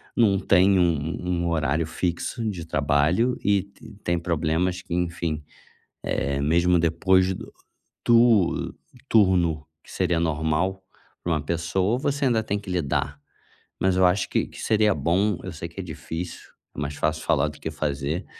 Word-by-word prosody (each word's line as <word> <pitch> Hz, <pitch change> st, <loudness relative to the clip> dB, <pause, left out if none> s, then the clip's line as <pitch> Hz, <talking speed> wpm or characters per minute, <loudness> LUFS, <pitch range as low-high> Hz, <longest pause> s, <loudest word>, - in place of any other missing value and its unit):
não 100 Hz, -5 st, +4 dB
tem 95 Hz, 0 st, +4 dB
um 85 Hz, -2 st, +4 dB, 0.3 s
um 90 Hz, -, -4 dB
um 85 Hz, -, 0 dB
horário 80 Hz, 0 st, 0 dB
fixo 90 Hz, +8 st, -3 dB
de 85 Hz, -5 st, -6 dB
trabalho 75 Hz, -, +1 dB
e 100 Hz, -2 st, +2 dB
t 100 Hz, +1 st, -15 dB
tem 85 Hz, 0 st, 0 dB
problemas 85 Hz, +2 st, 0 dB
que, 85 Hz, -, -7 dB
enfim, 85 Hz, -3 st, -2 dB, 0.6 s
eh, 70 Hz, 0 st, -1 dB
mesmo 85 Hz, +4 st, +3 dB
depois 90 Hz, +3 st, +3 dB
do -, -, -9 dB, 0.5 s
tur 115 Hz, -6 st, +4 dB, 0.3 s
turno 90 Hz, -8 st, +3 dB, 0.2 s
que -, -, -17 dB
seria 85 Hz, -1 st, 0 dB
normal 80 Hz, +4 st, 0 dB, 0.4 s
pra 85 Hz, -, -1 dB
uma 80 Hz, -, +1 dB
pessoa, 85 Hz, +7 st, 0 dB
você 140 Hz, +1 st, -1 dB
ainda 115 Hz, -3 st, +2 dB
tem 105 Hz, -1 st, -2 dB
que 100 Hz, -2 st, -9 dB
lidar. 85 Hz, -6 st, -1 dB, 0.6 s
Mas 95 Hz, -1 st, +2 dB
eu 95 Hz, 0 st, +4 dB
acho 90 Hz, +3 st, +2 dB
que -, -, +1 dB
que -, -, -11 dB
seria 105 Hz, -2 st, +3 dB
bom, 95 Hz, +3 st, +1 dB
eu -, -, -5 dB
sei -, -, -6 dB
que -, -, -12 dB
é -, -, -3 dB
difícil, 85 Hz, +1 st, -7 dB, 0.3 s
é -, -, -6 dB
mais 70 Hz, 0 st, -3 dB
fácil 75 Hz, +1 st, -1 dB
falar -, -, +2 dB
do -, -, -9 dB
que 80 Hz, -, -4 dB
fazer, 75 Hz, +2 st, -2 dB
85 Hz, 165 wpm, -24 LUFS, 80-95 Hz, 0.6 s, não